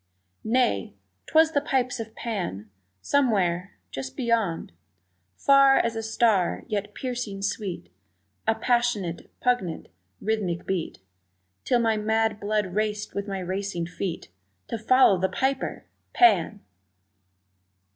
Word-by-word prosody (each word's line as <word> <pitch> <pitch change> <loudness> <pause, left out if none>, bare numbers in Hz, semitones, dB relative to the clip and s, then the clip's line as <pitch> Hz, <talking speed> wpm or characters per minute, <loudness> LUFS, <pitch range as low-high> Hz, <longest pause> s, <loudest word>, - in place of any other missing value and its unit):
Nay, 220 - +1 0.3
'twas 320 0 +4
the 285 - +1
pipes 255 -3 0
of 225 -1 -7
Pan! 175 - -4 0.3
Somewhere 195 -9 +1 0.2
just 135 -1 -6
beyond 225 - 0 0.7
Far 275 -1 +6
as 230 -1 +1
a 225 - -2
star, 220 -4 +1
yet 205 -2 -3
piercing 240 -6 -4
sweet, 185 - -3 0.6
A 220 - +3
passionate, 235 -9 0
poignant, 245 -10 0 0.3
rhythmic 200 -6 -2
beat 180 - -3 0.6
Till 245 - +3
my 225 -2 +2
mad 220 0 +1
blood 205 -3 -1
raced 210 0 -1
with 200 +1 -3
my 195 -1 -3
racing 185 -1 -3
feet 175 - -5 0.4
To 230 - -3
follow 220 -4 +5
the 190 +1 +1
piper 265 0 -2 0.3
Pan! 345 - +4
215 Hz, 115 wpm, -26 LUFS, 185-240 Hz, 0.7 s, Far